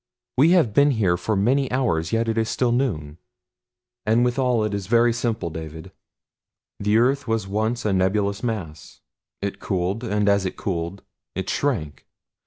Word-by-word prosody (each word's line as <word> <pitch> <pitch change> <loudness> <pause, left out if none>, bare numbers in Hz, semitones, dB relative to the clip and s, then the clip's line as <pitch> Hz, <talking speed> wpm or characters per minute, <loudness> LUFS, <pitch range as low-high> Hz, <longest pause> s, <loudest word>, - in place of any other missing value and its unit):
We 145 +6 +5
have 120 - +2
been 140 +6 +5
here 105 -9 +2
for 100 +5 -1
many 130 +7 +2
hours 105 -12 0
yet 115 0 +1
it 115 - 0
is 115 0 0
still 125 -2 +1
noon. 85 - -1 0.8
"And 115 +3 +3
withal 125 -2 +1
it 105 -1 -1
is 100 -2 -3
very 120 +1 +4
simple, 115 -7 -2
David. 80 0 -8 0.9
The 105 +2 +2
earth 135 +4 +2
was 115 -3 -1
once 110 +4 -1
a 105 - +2
nebulous 100 +2 +1
mass. 100 -11 -5 0.4
It 100 - -3
cooled, 95 +4 -2
and 105 -2 0
as 100 -1 +3
it 95 - -4
cooled 90 0 -3 0.3
it 95 0 -2
shrank. 100 - -2
105 Hz, 165 wpm, -23 LUFS, 95-120 Hz, 0.9 s, We